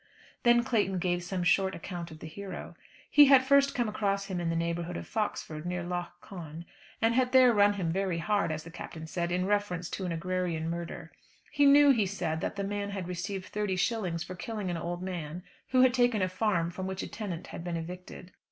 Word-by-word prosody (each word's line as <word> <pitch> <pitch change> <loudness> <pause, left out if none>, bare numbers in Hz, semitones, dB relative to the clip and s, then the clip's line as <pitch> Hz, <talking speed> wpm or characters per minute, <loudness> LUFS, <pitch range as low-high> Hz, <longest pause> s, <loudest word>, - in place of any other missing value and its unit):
Then 240 0 +5
Clayton 210 -7 +1
gave 175 0 0
some 180 0 -3
short 190 +1 +3
account 170 0 -6
of 155 - -10
the 160 - -9
hero. 200 +4 -7 0.4
He 295 - +9
had 270 -2 +7
first 280 0 +4
come 240 -3 +1
across 200 -2 -1
him 190 -3 -3
in 170 -1 -1
the 165 - 0
neighbourhood 170 +1 -2
of - - -6
Foxford 185 -8 -3
near 175 0 -3
Lough 175 0 -3
Conn, 170 -3 -9 0.4
and 225 +1 +4
had 255 +1 +2
there 255 -2 +7
run 205 -1 +5
him 180 -5 -2
very 190 -1 0
hard, 200 +1 +1
as 155 0 -4
the 165 - -11
Captain 160 -1 -8
said, 170 +1 -2
in 180 +1 +1
reference 195 -4 -1
to 190 - -3
an 180 - -2
agrarian 170 -1 -2
murder. 170 0 -6 0.4
He 290 -1 +4
knew, 285 0 +8
he 220 -7 +2
said, 170 -4 -2
that - - -2
the 200 - -2
man 200 0 -2
had 195 -3 -4
received 185 +2 -4
thirty 210 -2 -2
shillings 180 -5 -1
for 185 - -7
killing 200 0 -4
an - - -2
old 175 +2 -4
man 175 -2 -5 0.3
who 255 -1 +4
had 255 -1 +5
taken 245 -5 +3
a - - +2
farm 185 -3 0
from 185 +1 -5
which 190 0 -4
a - - -4
tenant 185 -6 -5
had - - -6
been 175 -1 -3
evicted. 180 +2 -8
185 Hz, 220 wpm, -30 LUFS, 170-210 Hz, 0.4 s, He